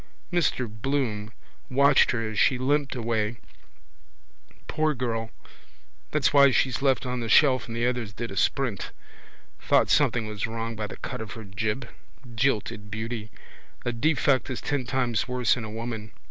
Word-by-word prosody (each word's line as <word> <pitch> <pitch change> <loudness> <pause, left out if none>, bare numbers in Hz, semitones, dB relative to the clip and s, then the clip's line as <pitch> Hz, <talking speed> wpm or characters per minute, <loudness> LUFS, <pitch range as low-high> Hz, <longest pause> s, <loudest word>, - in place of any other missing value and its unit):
Mr 145 -7 +1
Bloom 110 -1 -2 0.4
watched 140 +1 +5
her 115 -2 0
as 110 -1 -3
she 130 - +4
limped 140 +2 0
away. 115 -2 -1 1.3
Poor 155 -1 0
girl! 115 -3 -2 0.8
That's 150 -2 +1
why 140 -1 +8
she's 130 0 +1
left 135 -1 +2
on 125 0 -2
the 115 -1 -4
shelf 130 +2 +5
and 115 0 -5
the 120 - +1
others 125 -4 -1
did 115 0 -6
a - - -6
sprint. 125 -2 0 0.7
Thought - - +3
something 115 -3 +3
was 105 +1 -3
wrong 115 0 -4
by 105 -1 -3
the - - -9
cut - - -5
of 110 - -6
her 115 - -8
jib. 105 +5 -3 0.5
Jilted 110 -4 0
beauty. 110 +1 -4 0.6
A 120 - +1
defect 140 +1 +2
is 130 - -3
ten 145 -3 -2
times 120 -2 0
worse 125 -2 +2
in 125 - -5
a 110 - -6
woman. 110 -1 -5
120 Hz, 160 wpm, -26 LUFS, 110-130 Hz, 1.3 s, why